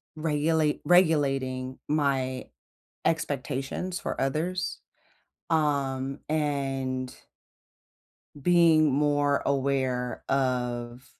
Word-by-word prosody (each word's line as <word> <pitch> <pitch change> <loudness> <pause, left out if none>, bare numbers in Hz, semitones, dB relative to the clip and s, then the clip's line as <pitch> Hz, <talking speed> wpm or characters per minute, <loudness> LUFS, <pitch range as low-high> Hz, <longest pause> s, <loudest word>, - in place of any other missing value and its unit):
regulate 155 0 +1
regulating 135 -7 +2
my 135 -4 0 0.6
expectations 145 +3 -2
for - - -4
others, 170 +7 -1 0.7
um, 140 -3 0
and 135 -4 -1 1.3
being 165 -2 +5
more 145 0 +2
aware 130 -3 0
of 125 -2 -1
140 Hz, 65 wpm, -27 LUFS, 130-155 Hz, 1.3 s, being